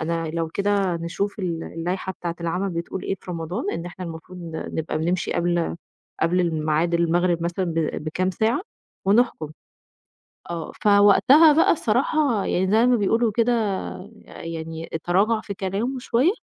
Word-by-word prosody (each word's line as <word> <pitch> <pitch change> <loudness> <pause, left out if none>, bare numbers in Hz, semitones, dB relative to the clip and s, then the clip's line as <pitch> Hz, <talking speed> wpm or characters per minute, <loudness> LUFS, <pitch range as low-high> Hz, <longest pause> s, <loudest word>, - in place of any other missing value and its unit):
أنا 165 0 -2
لو 165 0 -2
كده 200 0 0
نشوف 175 +5 -3
ال 170 -4 -3
اللايحة 180 +3 -3
بتاعة 170 -2 -5
العَمَل 180 +4 -1
بتقول 170 +2 -4
إيه - - -1
في - - -9
رمضان، 175 +6 -3
إن 170 +1 -4
إحنا 175 +1 -7
المفروض 170 +2 -8
ن 165 -2 -6
نبقى 160 -1 -2
بنمشي 175 +3 -1
قبل 170 -1 0 0.5
قبل 175 +3 +2
الميعاد 160 0 0
المغرب 170 0 +2
مثلًا 175 +2 -1
ب 165 -3 -2
بكام 185 +4 -1
ساعة 220 - +1 0.5
ونحكُم 200 -7 +2 1.0
آه، 170 -1 -4
فوقتها 210 +10 +6
بقى 325 - +4
الصراحة 280 -10 +1
يعني 185 +1 0
زي 225 +3 +5
ما 250 - +5
بيقولوا 225 +1 +2
كده 235 +3 +2 0.7
يعني 165 0 -7
تراجع 210 +5 +2
في 200 - -6
كلامه 205 +8 -2
شوية، 255 +8 +2
180 Hz, 150 wpm, -23 LUFS, 165-205 Hz, 1.0 s, فوقتها